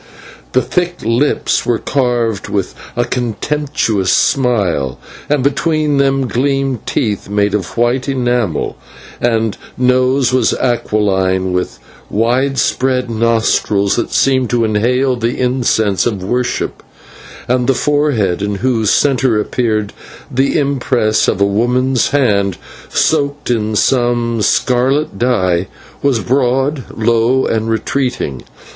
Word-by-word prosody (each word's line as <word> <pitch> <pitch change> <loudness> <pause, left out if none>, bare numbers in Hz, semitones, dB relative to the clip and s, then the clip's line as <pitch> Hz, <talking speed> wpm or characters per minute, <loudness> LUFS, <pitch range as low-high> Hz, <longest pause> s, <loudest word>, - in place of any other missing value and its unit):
The 130 - +3
thick 175 0 -1
lips 120 +6 +1
were 120 -2 +1
curved 120 -6 -1
with 100 -3 -2 0.2
a 120 0 +1
contemptuous 120 -4 -1
smile, 100 - +1 0.3
and 145 -3 +1
between 150 +1 +1
them 135 -1 +2
gleamed 135 -1 -1
teeth 105 -7 -2
made 100 0 +1
of 95 -3 -3
white 125 +3 +1
enamel; 120 - -1 0.4
the 115 -3 +1 0.2
nose 125 +1 +2
was 130 - +2
aquiline, 95 -6 0
with 90 -8 -2 0.3
widespread 125 +2 0
nostrils 110 -3 +1
that 120 - -2
seemed 130 -3 +2
to 120 -1 +1
inhale 125 +5 +1
the 120 +2 -2
incense 120 -6 +1
of 100 -6 -3
worship; 125 +5 -2 0.7
and 125 0 +1
the 135 - +3
forehead, 130 -11 +1
in 100 0 -1
whose 115 -1 0
centre 130 -5 +2
appeared 110 -2 -1 0.4
the 135 +5 +1
impress 130 -6 +1
of - - 0
a 100 - +4
woman's 125 +5 +1
hand 100 -9 +1 0.3
soaked 145 -3 0
in 110 -2 -1
some 120 -1 +1
scarlet 130 +2 +1
dye, 95 -8 +1 0.3
was 135 -5 +1
broad, 130 - 0
low, 115 +3 +2
and 110 0 -1
retreating. 115 - -2
120 Hz, 115 wpm, -15 LUFS, 105-130 Hz, 0.7 s, a